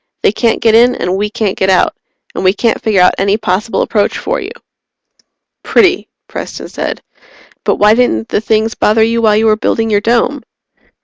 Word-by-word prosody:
They - - +4
can't 230 -2 0
get 225 -1 +3
in 240 +2 +4
and 180 -5 -2
we 205 +2 -2
can't 210 -2 -2
get 190 - 0
out 185 - +2 0.4
and - - -4
we 185 0 +3
can't 230 +2 -1
figure 210 -5 +1
out 180 - +4
any 200 +2 +1
possible 215 +1 -1
approach 210 -2 -1
for - - -3
you." - - -6 1.1
"Pretty," 375 -2 +1 0.2
Preston - - -7
said. - - -5 0.6
"But - - +2
why 210 +1 +4
didn't 165 - 0
the - - -1
things 220 0 0
bother 220 +1 +2
you 230 +1 0
while 215 -2 +3
you 220 - +1
were 215 -1 +4
building 225 +1 -1
your 205 -1 +2
Dome?" 240 +5 0
220 Hz, 190 wpm, -13 LUFS, 205-230 Hz, 1.1 s, They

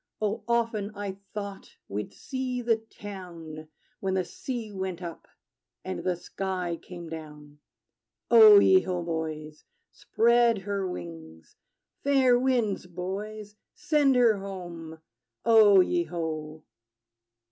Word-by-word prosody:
Oh, 210 0 -2
often 230 -3 0
I 200 -1 -5 0.2
thought 200 -2 -7
we'd 105 +2 -4
see 255 -2 -4
the 230 -1 +3
town, 175 -8 -10 0.3
When 190 -1 -1
the 185 -1 0
sea 235 -1 -6
went 190 -3 -4
up, 170 -2 -8 0.6
and 95 - -4
the 180 -1 0
sky 180 -1 -4
came 175 -2 -9
down. 150 -2 -10 0.7
O 430 -2 +10
ye 380 -1 +7
ho, 180 -2 -3
boys! 155 -2 -5 0.3
Spread 235 0 +3
her 200 -2 -2
wings! 80 - -9 0.5
Fair 265 -3 +4
winds, 240 -8 0
boys: 205 +4 -6 0.2
send 295 -5 +2
her 235 -4 +4
home! 175 -4 -8 0.5
O 215 -4 +7
ye 345 - +1
ho! 155 -2 -5
195 Hz, 115 wpm, -27 LUFS, 165-230 Hz, 0.7 s, O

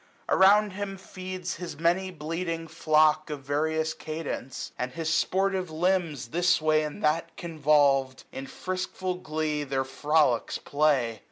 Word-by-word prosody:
Around 205 +2 +5
him 195 0 -5
feeds 185 -1 -6
his 175 -2 -7
many 175 +4 +1
bleating 165 0 -4
flock. 155 -1 +3
Of 145 -2 -5
various 155 +3 0
cadence; 155 -4 -5
and 125 +1 -4
his 160 0 -1
sportive 190 0 +1
lambs. 160 -6 0
This 175 +4 +3
way 155 0 +3
and 155 +7 -5
that 165 +2 0
convolvM, 145 -5 +2
in 135 0 -7
friskful 185 +1 -4
glee. 155 -2 -2
Their 135 -1 -1
frolicks 145 -2 +1
play. 140 -7 +1
160 Hz, 135 wpm, -27 LUFS, 150-180 Hz, -, Around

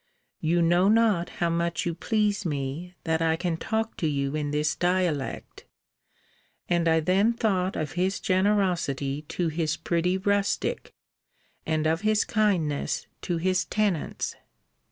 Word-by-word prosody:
You 170 +2 +2
know 175 +3 +4
not 215 -5 +3
how 170 -1 -1
much 170 +1 -1
you 170 - -1
please 210 +3 0
me, 150 +3 -4
that 160 0 0
I 160 0 +2
can 170 0 -1
talk 220 +6 -2
to 160 - 0
you 140 -1 -1
in 150 -1 -2
this 150 +1 0
dialect. 175 -6 -1 1.0
And 170 -1 +1
I 160 0 +4
then 195 +8 +3
thought 195 -5 0
of 150 -3 -3
his 185 +2 0
generosity 180 -8 +1
to 175 -2 -1
his 160 0 -1
pretty 175 +2 0
rustic; 200 - -1 0.7
and 155 -1 0
of 160 +2 +1
his 215 0 +2
kindness 185 -10 0 0.2
to 175 -2 -2
his 185 +1 +1
tenants. 205 -7 -1
175 Hz, 140 wpm, -26 LUFS, 160-195 Hz, 1.0 s, know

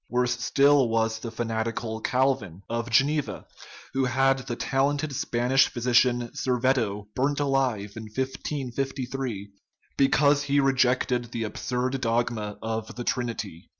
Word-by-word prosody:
Worse 125 0 0
still 140 -1 +4
was 115 0 0
the 115 - -5
fanatical 115 0 -3
Calvin, 120 -10 0
of 115 0 -3
Geneva, 140 +5 +1 0.5
who 135 0 +1
had 135 +1 +2
the 125 -2 -5
talented 140 +3 0
Spanish 125 +1 +2
phy 120 - -7
sician, 120 0 +2
Serveto, 120 -5 0
burned 140 +3 0
alive 130 -8 0
in 110 - -7
1553, 130 -2 -4 0.5
because 140 +1 +4
he 145 0 +1
re 135 -1 +3
jected 125 -2 +1
the 115 -1 -3
absurd 125 +4 -2
dogma 115 -3 -1
of 110 0 -4
the 120 - -5
Trinity. 115 -9 -3
125 Hz, 130 wpm, -26 LUFS, 115-135 Hz, 0.5 s, still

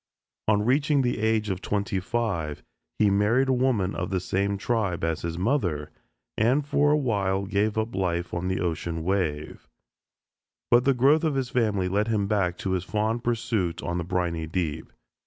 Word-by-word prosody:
On 105 -1 +3
reaching 140 +2 +2
the 120 -3 0
age 110 -1 +1
of 95 0 -4
twenty 100 -2 -1
five 95 -8 -2 0.3
he 105 -2 +3
married 110 +7 +2
a - - +4
woman 125 -7 +1
of 90 - -3
the 95 -1 0
same 100 +2 -1
tribe 100 -6 -1
as 80 -1 -1
his 85 0 -4
mother, 90 - 0 0.5
and 130 +7 +3
for 145 0 +2
a 150 - +4
while 100 -7 0
gave 105 +2 0
up 110 +1 -1
life 85 -2 -1
on 85 +1 -2
the 95 0 -1
ocean 85 -1 -2
wave; 85 -5 -2 1.0
but 120 +1 +5
the 135 -1 +4
growth 140 +6 +4
of 155 -3 +1
his 130 -2 -2
family 105 -6 +1
led 100 +4 0
him 105 -3 +1
back 100 -4 0
to 95 - -3
his 95 -1 0
fond 110 +4 -1
pursuit 110 -8 -1
on 85 +1 -2
the - - -2
briny 85 -2 -2
deep. 80 -2 -3
100 Hz, 180 wpm, -26 LUFS, 90-120 Hz, 1.0 s, but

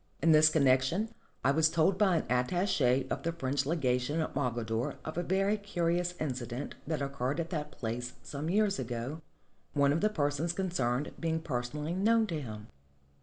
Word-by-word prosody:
In 165 - +4
this 155 0 +7
connection 140 +8 +3 0.3
I 140 - +4
was 160 +2 +4
told 170 +4 +2
by 195 -4 +4
an - - -2
attache 130 0 +2
of - - -1
the 170 - -1
French 140 -4 -1
legation 140 -2 0
at 155 - -2
Mogador 120 -3 -1
of 155 - -5
a 175 - 0
very 195 +4 +1
curious 175 -3 -1
incident 130 -2 -4
that 155 -2 -1
occurred 140 +1 -2
at 170 +1 -3
that 150 -3 -3
place 120 +2 -4
some 145 +3 -4
years 200 +1 +2
ago, 125 +6 -4 0.5
one 140 -1 +3
of 160 - 0
the 215 - +3
persons 150 -2 0
concerned 150 -8 -1
being 160 -1 0
personally 150 +2 -3
known 220 +4 +3
to 165 -7 -3
him. 110 -4 -8
150 Hz, 170 wpm, -31 LUFS, 130-170 Hz, 0.5 s, this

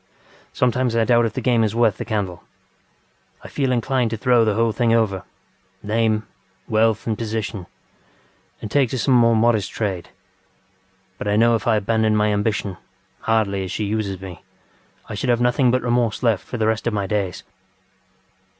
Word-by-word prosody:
Sometimes 125 -1 0
I 115 - +3
doubt 120 0 +3
if - - -7
the 130 - -3
game 120 -3 +3
is 110 0 -1
worth 115 -4 +2
the - - -5
candle. 100 -6 -3 1.0
I - - -9
feel 135 -2 -1
inclined 125 0 0
to 115 - -4
throw 120 +1 +3
the 110 -2 +1
whole 115 +1 +2
thing 120 +1 0
overŌĆöname, 110 0 -2 0.4
wealth 110 -1 +1
and 110 - -1
positionŌĆöand 110 -4 -4 1.0
take 135 0 +2
to 130 - -3
some 130 +2 +1
modest 115 -3 +3
trade. 95 -6 -3 1.1
But - - -4
I 105 - +1
know 115 +2 +4
if 115 -1 -1
I 115 - +4
abandoned 110 +1 +1
my 105 0 +2
ambitionŌĆöhardly 105 0 -2
as 95 - -6
she - - -2
uses 100 -2 -2
meŌĆöI 95 -2 -9 0.8
should 105 +5 -3
have 120 -1 +3
nothing 125 +1 +2
but 130 +1 +1
remorse 120 -1 0
left 110 -6 +1
for 120 - -5
the 110 - 0
rest 110 +1 0
of 115 - 0
my 100 -1 -1
days. 95 -3 -2
110 Hz, 165 wpm, -21 LUFS, 105-120 Hz, 1.1 s, know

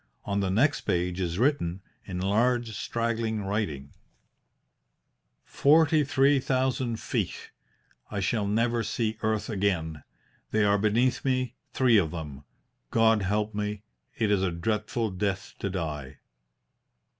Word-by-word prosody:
On 100 0 -1
the 95 -1 0
next 130 +10 +2
page 90 +1 -1
is 85 -2 -2
written, 100 - +1 0.2
in 90 -2 -5
large, 115 +5 +1
straggling 115 -1 -2
writing: 90 -9 -3 1.5
"Forty 155 +1 +4
three 140 0 +3
thousand 130 -3 0
feet. - - -3 0.6
I 100 - -3
shall 100 +2 0
never 115 +3 +1
see 110 -1 -2
earth 110 -1 0
again. 90 -7 -1 0.5
They 110 -1 +2
are 100 0 +3
beneath 120 +4 +2
me, 130 -2 0 0.2
three 125 -4 +4
of 85 -6 +2
them. 75 -4 -7 0.4
God 115 -1 +4
help 105 +3 0
me; 105 0 -3 0.3
it 110 -2 +1
is 100 -2 +3
a 95 - +1
dreadful 105 +5 -1
death 95 0 -2
to 100 - -2
die!" 75 -7 -4
105 Hz, 130 wpm, -27 LUFS, 95-120 Hz, 1.5 s, Forty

